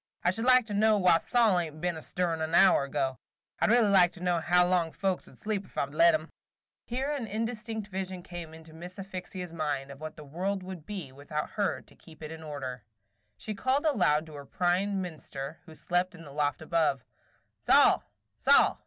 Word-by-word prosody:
I 175 - +4
should 225 +5 -2
like 255 -2 +6
to 210 - -6
know 215 +1 +4
why 180 -4 +5
Sol 225 -3 +3
ain't 155 -3 -5
been 175 +1 -1
a 160 - -7
stirrin' 170 -2 -1
an 160 +1 0
hour 185 -6 +6
ago. 135 -2 -2 0.4
I - - +3
'd - - +1
really 230 -3 +4
like 180 -3 +6
to 180 - -10
know 175 -2 +2
how 180 0 +4
long 175 -2 +1
folks 190 0 -2
would - - -17
sleep 210 -2 -2
ef - - -18
I - - +2
'd 140 - -15
let 165 +1 +6
'em." 155 +1 -5 0.5
Here 265 +4 -2
an 275 -6 -3
indistinct 220 0 -4
vision 190 -2 -5
came 175 -3 -8
into 160 0 -13
Miss 175 +3 -10
Asphyxia's 185 -2 -7
mind 145 -4 -2
of 140 +2 -12
what 155 0 -7
the 150 - -9
world 185 +6 -3
would 180 -4 -8
be 185 -10 -6
without 145 +3 -5
her 205 -2 -1
to - - -18
keep 160 -2 -15
it 155 - -6
in 160 0 -8
order. 135 -6 -6 0.5
She 215 - -5
called 260 +8 0
aloud 180 - +3
to 155 - -12
her 140 -1 -9
prime 190 +2 0
minster, 155 -3 -7
who 160 - -12
slept 180 +3 -1
in 165 - -12
the 145 - -11
loft 145 +1 -1
above, 155 -6 +1 0.6
"Sol! - - +5
175 Hz, 210 wpm, -29 LUFS, 155-200 Hz, 0.6 s, like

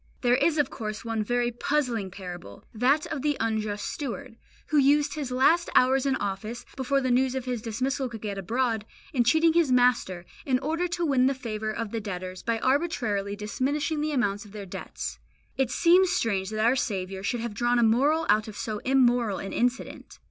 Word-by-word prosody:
There 245 -1 +3
is 320 +3 +2
of 290 -3 +1
course 215 0 -5
one 225 -1 -1
very 240 +2 0
puzzling 240 -5 -1
parable, 180 - -9
that 270 +8 +2
of 295 - -3
the 295 0 0
unjust 215 -2 -1
steward, 270 -3 -5 0.3
who 300 - +4
used 285 +1 +3
his 290 -4 -4
last 320 +7 +3
hours 265 +2 +4
in 270 - +2
office, 210 +2 -4
before 275 +1 0
the 255 -1 0
news 255 +1 +2
of 260 -1 -3
his 250 -3 -2
dismissal 255 +4 -2
could 225 -2 -9
get 205 -2 -3
abroad, 225 +2 0 0.3
in 250 -4 +3
cheating 320 +7 +4
his 330 -5 +3
master, 245 -8 +2 0.2
in 260 -2 +2
order 320 +7 -1
to 345 0 -2
win 260 -4 +3
the 275 - +1
favour 220 -4 -4
of 215 -1 -4
the 225 - -3
debtors 185 -2 -6
by 230 -1 0
arbitrarily 245 -9 0
diminishing 285 +9 -1
the 305 0 -1
amount 205 -7 0
of 205 -2 -15
their 205 -2 -7
debts. 180 - -6 0.4
It 265 -3 +1
seems 350 +7 +4
strange 200 - 0
that 215 0 0
our 240 +3 +4
Saviour 190 -6 -2
should 230 +4 -2
have 235 -2 -4
drawn 240 +3 +1
a 240 - +4
moral 280 +9 +3
out 215 +1 +3
of 215 - -8
so 215 -2 -3
immoral 245 -5 +2
an 195 - -6
incident. 245 +2 -2
245 Hz, 200 wpm, -27 LUFS, 215-275 Hz, 0.4 s, who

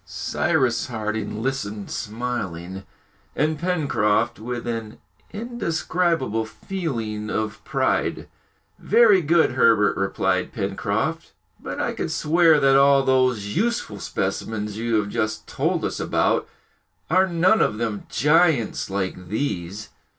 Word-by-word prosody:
Cyrus 135 -8 0
Harding 110 -2 -3
listened 105 -6 -3
smiling, 100 -6 -4 0.5
and 155 +1 0
Pencroft 120 - +1
with 120 +2 -5
an 115 -2 -4 0.3
indescribable 170 - -1
feeling 110 - -4
of 110 -1 -3
pride. - - -1 0.5
"Very 215 -4 +5
good, 165 0 +3
Herbert," 115 -5 +4
replied 95 0 -1
Pencroft, - - -2 0.3
"but - - -6
I - - -1
could - - -3
swear 160 0 +4
that 135 -1 +4
all 140 0 +5
those 125 -6 +1
useful 225 - -1
specimens 105 0 -3
you 115 +1 -1
have 105 -2 +1
just 110 -1 -2
told - - -1
us - - -3
about - - +1 0.6
are 185 +3 +4
none 180 +5 +3
of 105 - +1
them 110 -3 -3
giants 150 - +2
like 95 -2 -3
these!" 100 -3 -3
120 Hz, 115 wpm, -23 LUFS, 105-160 Hz, 0.6 s, Very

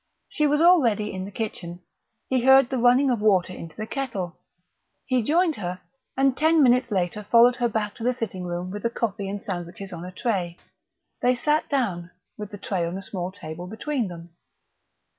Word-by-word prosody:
She 300 - +1
was 295 +1 +2
already 235 - +4
in 185 0 -4
the 200 - -8
kitchen; 180 -5 -5 0.5
he 260 -1 +1
heard 265 0 +6
the 260 - 0
running 250 +3 +4
of 235 -4 -1
water 190 -4 +3
into 165 -3 -9
the 215 - -4
kettle. 220 -9 -4 0.7
He 255 -2 +1
joined 325 +6 +2
her, 180 -2 -4 0.4
and 270 -1 +3
ten 315 +1 +4
minutes 250 -1 +4
later 190 0 -1
followed 235 +3 +5
her 240 -1 +1
back 210 -2 -2
to 225 - -7
the 250 - +3
sitting 225 -7 -5
room 175 +1 -4
with 205 +1 -5
the 235 - 0
coffee 205 -4 -3
and 200 0 -5
sandwiches 185 +1 -6
on 170 0 -7
a 180 - -7
tray. 180 -4 -2 0.6
They 250 +1 +3
sat 300 +5 0
down, 195 - -1 0.3
with 210 -1 -7
the 205 - -8
tray 190 -2 -2
on 170 +2 -3
a 195 - -7
small 185 -2 -4
table 175 -2 -8
between 235 +4 -2
them. 170 -1 -10
210 Hz, 195 wpm, -25 LUFS, 185-250 Hz, 0.7 s, heard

